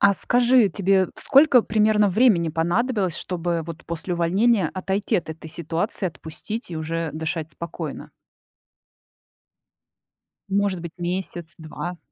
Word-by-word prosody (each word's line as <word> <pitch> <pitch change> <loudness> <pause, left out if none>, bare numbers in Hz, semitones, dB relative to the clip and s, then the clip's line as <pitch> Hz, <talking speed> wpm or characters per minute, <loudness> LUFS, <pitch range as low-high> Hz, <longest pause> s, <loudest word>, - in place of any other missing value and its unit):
А 200 0 +6
скажи, 245 0 +3
тебе 190 0 +2
сколько 275 -4 +5
примерно 210 -1 +3
времени 190 -5 +3
понадобилось, 185 - 0
чтобы 170 -2 -2
вот 165 0 -8
после 170 +2 -3
увольнения 195 +6 +2
отойти 190 +2 -1
от 165 - -3
этой 160 0 -9
ситуации, 170 +5 -3
отпустить 180 +7 -7
и 165 - -4
уже 160 0 -3
дышать 160 0 -4
спокойно? 170 +2 -7 2.4
Может 195 -2 0
быть, 170 -1 -7
месяц, 175 -1 -4
2? 170 +2 -6
180 Hz, 120 wpm, -23 LUFS, 165-210 Hz, 2.4 s, А